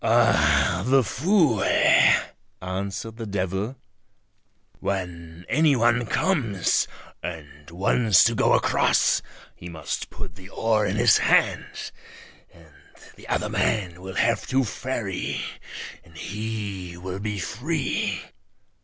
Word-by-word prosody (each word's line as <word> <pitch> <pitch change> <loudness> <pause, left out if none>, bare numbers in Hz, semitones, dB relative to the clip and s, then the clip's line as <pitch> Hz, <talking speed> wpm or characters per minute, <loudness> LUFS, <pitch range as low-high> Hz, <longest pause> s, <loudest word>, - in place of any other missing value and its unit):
"Ah! 75 +3 +3
the 130 +3 +4
fool," 150 - +2 1.0
answered 100 +4 -5
the 115 -2 -6
devil; 95 +4 -2 1.0
"when 90 -3 -5
any 150 -1 +3
one 120 0 +2
comes 115 - +1 0.3
and 75 -3 -8
wants 100 +3 +3
to - - +3
go - - +3
across - - +3 0.3
he 85 - -10
must 80 -2 -5
put - - -8
the 95 +3 -14
oar 110 0 +1
in 95 - -1
his - - +5
hand, - - +1 0.6
and - - -19 0.4
the - - -14
other - - -1
man 90 -5 -1
will 95 0 -8
have 115 0 +1
to 135 +1 +2
ferry 110 -3 -3 0.6
and 80 -1 -17
he 100 -4 -5
will 95 +1 -6
be 105 0 -3
free." 130 - -2
100 Hz, 115 wpm, -24 LUFS, 90-115 Hz, 1.0 s, his